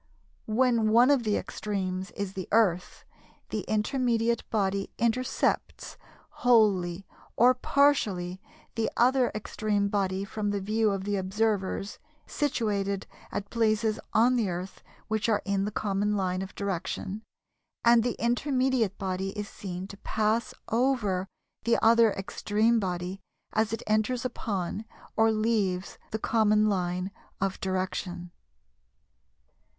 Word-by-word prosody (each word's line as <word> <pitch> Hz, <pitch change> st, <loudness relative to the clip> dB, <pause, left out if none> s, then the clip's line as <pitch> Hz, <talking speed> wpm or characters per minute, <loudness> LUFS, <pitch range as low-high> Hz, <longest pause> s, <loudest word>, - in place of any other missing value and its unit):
When 230 Hz, -1 st, +2 dB
one 240 Hz, +5 st, +6 dB
of 280 Hz, -3 st, +4 dB
the 215 Hz, -3 st, +1 dB
extremes 190 Hz, -2 st, -3 dB
is 200 Hz, -1 st, -3 dB
the 190 Hz, -2 st, -5 dB
Earth, 190 Hz, -6 st, +1 dB, 0.4 s
the -, -, -2 dB
intermediate 235 Hz, +1 st, 0 dB
body 195 Hz, -2 st, 0 dB
intercepts, 235 Hz, +2 st, 0 dB, 0.5 s
wholly 195 Hz, -7 st, +3 dB, 0.3 s
or 245 Hz, +2 st, +6 dB
partially, 215 Hz, -10 st, +1 dB, 0.3 s
the 225 Hz, -1 st, 0 dB
other 250 Hz, +1 st, +4 dB
extreme 210 Hz, -1 st, -1 dB
body 195 Hz, -1 st, 0 dB
from 205 Hz, +1 st, -3 dB
the 205 Hz, 0 st, -1 dB
view 215 Hz, +3 st, +1 dB
of 195 Hz, -1 st, -2 dB
the 205 Hz, 0 st, -1 dB
observers 195 Hz, 0 st, -1 dB, 0.3 s
situate 215 Hz, -9 st, -1 dB, 0.4 s
at 205 Hz, 0 st, -4 dB
places 220 Hz, -1 st, +1 dB
on 245 Hz, +3 st, +4 dB
the 220 Hz, -5 st, +1 dB
Earth 180 Hz, +2 st, -5 dB, 0.3 s
which 220 Hz, 0 st, 0 dB
are 210 Hz, -2 st, +2 dB
in 200 Hz, -1 st, 0 dB
the 210 Hz, -, -3 dB
common 205 Hz, 0 st, 0 dB
line 185 Hz, -1 st, -1 dB
of 190 Hz, +1 st, -7 dB
direction, 195 Hz, +1 st, -3 dB, 0.6 s
and 235 Hz, 0 st, +7 dB
the 240 Hz, 0 st, -1 dB
intermediate 255 Hz, -3 st, +1 dB
body 190 Hz, +1 st, -3 dB
is 210 Hz, -1 st, -3 dB
seen 185 Hz, -2 st, -6 dB
to 200 Hz, -, -9 dB
pass 220 Hz, +3 st, 0 dB, 0.2 s
over 225 Hz, -6 st, +1 dB, 0.4 s
the 230 Hz, +1 st, +3 dB
other 230 Hz, -1 st, +6 dB
extreme 210 Hz, +3 st, +1 dB
body 180 Hz, 0 st, -3 dB, 0.3 s
as 220 Hz, 0 st, +1 dB
it 225 Hz, -, -3 dB
enters 215 Hz, +4 st, +1 dB
upon 205 Hz, -5 st, -3 dB, 0.3 s
or 225 Hz, 0 st, +4 dB
leaves 215 Hz, -4 st, 0 dB
the 220 Hz, -, -2 dB
common 215 Hz, -1 st, +3 dB
line 180 Hz, -1 st, -1 dB, 0.3 s
of 195 Hz, 0 st, -2 dB
direction. 185 Hz, -2 st, -3 dB
210 Hz, 125 wpm, -28 LUFS, 195-230 Hz, 0.6 s, and